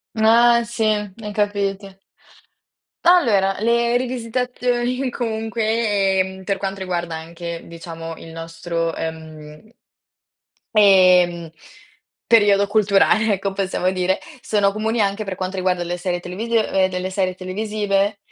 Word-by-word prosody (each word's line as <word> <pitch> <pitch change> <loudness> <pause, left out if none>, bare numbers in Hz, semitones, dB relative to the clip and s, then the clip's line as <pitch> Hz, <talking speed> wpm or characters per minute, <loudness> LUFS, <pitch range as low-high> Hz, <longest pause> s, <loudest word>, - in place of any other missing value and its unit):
Ah 235 +2 +5
sì, 230 0 -3
e 210 0 -2
capite. 200 -1 -2 1.1
Allora 220 - +4
le 235 +1 +2
rivisitazioni 250 +1 -1
comunque, 220 -4 0
ehm, 190 0 -2
per 195 +1 -1
quanto 195 0 -4
riguarda 175 -3 -3
anche, 170 +1 -7
diciamo 165 -1 -8
il 165 - -12
nostro, 165 0 -4
ehm 160 +2 -8 1.0
ehm, 180 -4 +5 0.8
periodo 205 -3 +4
culturale 210 +1 +3
ecco 195 0 -3
possiamo 190 -2 -1
dire, 185 0 0 0.2
sono 205 -2 +2
comuni 220 +3 -2
anche 200 +1 0
per 195 - -4
quanto 185 +1 -4
riguarda 185 -1 0
le 175 0 -3
serie 175 0 -3
televisiv 220 +7 -2
ehm, 190 -3 +1
delle 180 0 -3
serie 185 -1 -1
televisive. 200 +1 -1
195 Hz, 120 wpm, -20 LUFS, 180-220 Hz, 1.1 s, Ah